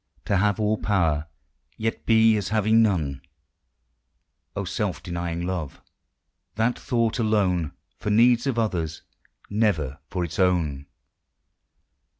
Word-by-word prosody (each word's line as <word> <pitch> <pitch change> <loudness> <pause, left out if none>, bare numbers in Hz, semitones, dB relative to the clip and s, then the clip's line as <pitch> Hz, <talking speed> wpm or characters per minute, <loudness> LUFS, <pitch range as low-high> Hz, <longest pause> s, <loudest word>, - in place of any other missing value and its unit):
To 100 - +1
have 100 +1 +1
all 110 0 +1
power, 80 -7 +1 0.5
yet 115 0 -3
be 110 -1 +5
as 100 -4 -2
having 110 +1 +3
none! 80 -11 0 1.3
Oh, - - -2
self - - -3
denying 85 0 -3
love, 90 -6 -4 0.8
that 115 +3 0
thought 115 -1 0
alone 95 -8 +1 0.3
For - - -3
needs 120 +4 +4
of 130 -4 -1
others, 85 -8 -1 0.5
never 85 - 0
for 90 -2 -3
its 85 - -5
own 80 -7 +1
100 Hz, 120 wpm, -25 LUFS, 85-110 Hz, 1.3 s, be